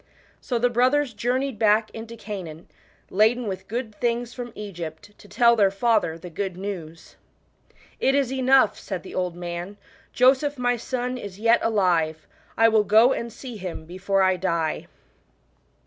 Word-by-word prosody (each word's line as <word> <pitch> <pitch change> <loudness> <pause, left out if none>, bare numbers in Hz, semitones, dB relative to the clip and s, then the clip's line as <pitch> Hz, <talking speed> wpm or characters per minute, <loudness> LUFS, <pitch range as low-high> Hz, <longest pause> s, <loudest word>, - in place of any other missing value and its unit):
So 245 - -2
the 245 +1 +2
brothers 255 +2 +2
journeyed 250 +2 -1
back 215 0 +3
into 230 +1 -9
Canaan, 185 -7 -7 0.4
laden 220 +5 +3
with 190 -3 -5
good 230 0 -4
things 240 +1 -2
from 245 -1 -7
Egypt, 175 -4 -7
to - - -17
tell 235 +3 +4
their 200 -3 +4
father 200 -5 +1
the 175 +1 -10
^ood 190 +2 -3
news. 175 -4 -7 0.8
"It 270 - +2
is 270 -2 +1
enough," 260 -4 +3
said 185 -4 -5
the - - -10
old 180 -2 -2
man; 175 +3 -6 0.3
"Joseph 270 +3 +3
my 245 0 +1
son 250 +1 -3
is 200 -4 -8
yet 230 +2 +4
alive: 175 -8 +1 0.3
I 225 - +6
will 220 -1 +4
go 225 +5 +5
and 235 0 -4
see, 245 0 -9
him 180 -4 -6
before 190 +3 0
I 185 -1 +3
die." 170 -3 -1
215 Hz, 160 wpm, -24 LUFS, 185-245 Hz, 0.8 s, I